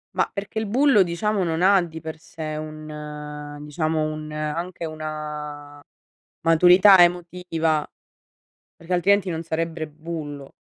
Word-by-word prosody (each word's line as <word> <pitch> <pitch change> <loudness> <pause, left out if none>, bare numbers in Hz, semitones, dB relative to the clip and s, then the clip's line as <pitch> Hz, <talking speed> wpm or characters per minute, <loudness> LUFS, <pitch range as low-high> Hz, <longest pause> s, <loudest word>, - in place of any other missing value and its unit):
Ma, - - +1
perché 205 +2 -4
il 220 - -3
bullo 260 0 +4
diciamo 190 +3 0
non 165 0 -1
ha 195 0 +6
di 160 -2 -6
per 160 0 -7
sé 155 -1 -6
un 150 -1 -7
diciamo 155 +1 -1
un 155 0 -4
anche 165 +3 -4
una 150 -2 -6 0.6
maturità 180 +4 +7
emotiva, 175 -3 +1 0.9
perché 170 +2 -8
altrimenti 190 +1 +3
non 165 0 -3
sarebbe 160 0 -3
bullo. 150 -2 -7
160 Hz, 125 wpm, -23 LUFS, 155-175 Hz, 0.9 s, maturità